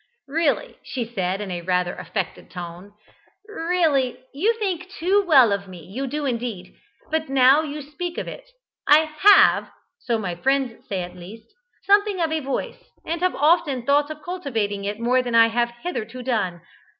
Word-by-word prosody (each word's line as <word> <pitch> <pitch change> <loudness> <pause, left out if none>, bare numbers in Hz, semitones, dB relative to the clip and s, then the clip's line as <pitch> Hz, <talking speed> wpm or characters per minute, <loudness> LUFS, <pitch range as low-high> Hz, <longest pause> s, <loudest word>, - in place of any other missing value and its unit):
"Really," 325 - -1
she 245 -3 -4
said, 195 -4 -2
in 180 -4 -5
rather 180 -1 +1
an - - -10
affected 180 +1 -5
tone, 180 +3 -9 0.5
"really, 325 - 0 0.2
you 410 +12 +1
think 370 -4 -3
too 395 +1 +1
well 265 -9 +6
of 200 0 -2
me 180 -3 -11
you 255 +9 -5
do 295 +3 -3
indeed 230 -8 -4 0.4
but 315 -2 -1
now 270 +2 +5
you 300 -1 -6
speak 340 +5 -6
of - - -4
it, - - -9 0.4
I 300 +1 +7 0.2
have 410 +3 +6 0.3
(so 235 -2 -1
my 195 -5 -3
friends 260 +5 -1
say 190 -3 -2
at 180 +1 -9
least) 215 +6 -12 0.3
something 405 -1 +3
of 325 -2 0
a 320 - 0
voice, 275 -2 -4 0.2
and 335 +1 -3
have 365 0 +1
often 295 -4 +2
thought 290 +2 +3
of 305 -1 -8
cultivating 225 - -3
it 205 +2 -3
more 250 +2 +2
than 245 -2 -3
I 230 0 +7
have 235 +1 +1
hitherto 255 -7 -5
done. 205 -9 -1
260 Hz, 175 wpm, -23 LUFS, 205-320 Hz, 0.5 s, I